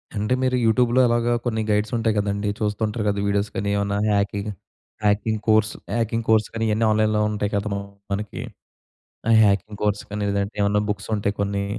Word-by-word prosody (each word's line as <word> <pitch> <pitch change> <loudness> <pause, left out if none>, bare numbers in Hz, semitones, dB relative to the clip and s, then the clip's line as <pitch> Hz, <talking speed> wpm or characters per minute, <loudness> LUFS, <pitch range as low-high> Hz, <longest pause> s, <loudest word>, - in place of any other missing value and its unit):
అంటే, 105 +4 0
మీరు 130 -1 +2
యూట్యూబ్‌లో 120 +2 +3
అలాగా 120 0 +1
కొన్ని 110 -2 0
గైడ్సుంటాయి 110 +2 +1
గదండీ! 100 0 0
చూస్తుంటారు 105 +1 -1
కదా, 100 -1 0
వీడియోస్ 100 +1 0
కానీ 100 +1 -1
ఏమన్నా, 100 0 0
hacking 100 0 0 0.5
hacking 105 +1 +1
course, 110 0 +4 0.2
hacking 115 0 0
course 110 -1 +4
కానీ 115 - -2
ఇయన్నీ 110 +2 +2
ఆన్‌లైన్‌లో 110 0 +2
ఉంటాయి 105 -1 -2
కదా! 100 +1 -1 0.4
మనకి. 105 +1 -3 0.9
ఆ - - +4
హ్యాకింగ్ 100 +1 +1
కోర్స్ 105 -1 0
కానీ, 105 0 -3
లేదంటే 100 +1 -1
ఏమన్నా 100 +1 +2
బుక్సుంటాయి 100 0 -2
కొన్నీ, 100 0 -1
105 Hz, 160 wpm, -23 LUFS, 100-110 Hz, 0.9 s, కోర్స్